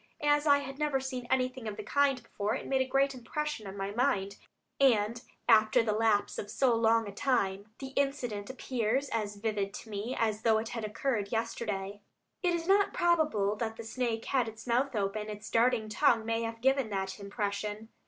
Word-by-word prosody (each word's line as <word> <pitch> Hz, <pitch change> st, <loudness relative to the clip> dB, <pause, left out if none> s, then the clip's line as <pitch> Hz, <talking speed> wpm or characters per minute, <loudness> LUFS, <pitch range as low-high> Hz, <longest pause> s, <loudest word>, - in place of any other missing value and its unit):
As 295 Hz, +1 st, +3 dB
I 285 Hz, -1 st, +7 dB
had 275 Hz, 0 st, -6 dB
never 295 Hz, -3 st, +1 dB
seen 260 Hz, -2 st, -5 dB
anything 255 Hz, -2 st, 0 dB
of 210 Hz, -1 st, -5 dB
the 210 Hz, -, -5 dB
kind 275 Hz, +1 st, +2 dB
before, 210 Hz, -2 st, -2 dB
it -, -, -5 dB
made 265 Hz, -1 st, +1 dB
a 260 Hz, -, 0 dB
great 275 Hz, +1 st, +2 dB
impression 260 Hz, -1 st, -4 dB
on 195 Hz, +1 st, -7 dB
my 195 Hz, 0 st, -3 dB
mind, 205 Hz, -4 st, 0 dB, 0.4 s
and 230 Hz, -3 st, +3 dB, 0.3 s
after 220 Hz, +2 st, +5 dB
the 220 Hz, -, 0 dB
lapse 215 Hz, -1 st, +1 dB
of 205 Hz, -, -5 dB
so 260 Hz, -3 st, +2 dB
long 225 Hz, -1 st, +3 dB
a -, -, -5 dB
time, 200 Hz, -4 st, 0 dB
the 270 Hz, -, -6 dB
incident 260 Hz, -7 st, -2 dB
appears 260 Hz, 0 st, -1 dB
as 210 Hz, -2 st, -2 dB
vivid 205 Hz, -1 st, -2 dB
to 220 Hz, -, -9 dB
me 210 Hz, +5 st, -3 dB
as 220 Hz, -1 st, 0 dB
though 225 Hz, -1 st, +4 dB
it 220 Hz, +1 st, -3 dB
had 230 Hz, -2 st, -4 dB
occurred 210 Hz, -1 st, -2 dB
yesterday." 205 Hz, -3 st, -3 dB, 0.4 s
It 355 Hz, -2 st, +2 dB
is 335 Hz, 0 st, -4 dB
not 400 Hz, +1 st, +3 dB
probable 305 Hz, -13 st, +2 dB
that 225 Hz, 0 st, -3 dB
the 230 Hz, -, -6 dB
snake 230 Hz, -1 st, -2 dB
had 255 Hz, -4 st, +1 dB
its 225 Hz, +1 st, -9 dB
mouth 250 Hz, +2 st, +1 dB
open; 210 Hz, +1 st, -1 dB
its 210 Hz, 0 st, -7 dB
darting 230 Hz, -1 st, +3 dB
tongue 225 Hz, 0 st, +3 dB
may 230 Hz, 0 st, 0 dB
have 230 Hz, 0 st, -4 dB
given 265 Hz, -2 st, +2 dB
that 190 Hz, -1 st, -3 dB
impression. 205 Hz, +1 st, -4 dB
230 Hz, 195 wpm, -31 LUFS, 210-265 Hz, 0.4 s, I